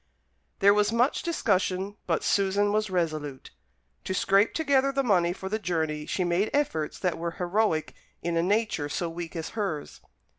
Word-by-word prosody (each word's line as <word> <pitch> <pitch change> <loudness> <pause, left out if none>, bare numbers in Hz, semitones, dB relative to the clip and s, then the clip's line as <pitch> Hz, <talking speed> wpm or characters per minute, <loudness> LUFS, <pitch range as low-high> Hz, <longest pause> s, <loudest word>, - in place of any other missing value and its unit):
There 200 +1 +7
was 210 0 +2
much 240 +4 +2
discussion; 195 - 0
but - - 0
Susan 200 +1 +2
was 215 -1 +1
resolute. 155 -6 -3 0.5
To 190 - -2
scrape 195 +3 +3
together 275 -3 +2
the 275 0 0
money 180 -7 +3
for 190 +1 -6
the 215 +3 -1
journey 160 -6 -2
she 185 - -1
made 175 +4 +1
efforts 160 - -1
that 180 -3 -1
were 170 0 -3
heroic 180 -3 0 0.3
in 170 0 -1
a 165 - +3
nature 195 -5 0
so 170 +2 -2
weak 170 0 -7
as 165 -1 -4
hers. 195 -9 -4
190 Hz, 170 wpm, -27 LUFS, 170-210 Hz, 0.5 s, There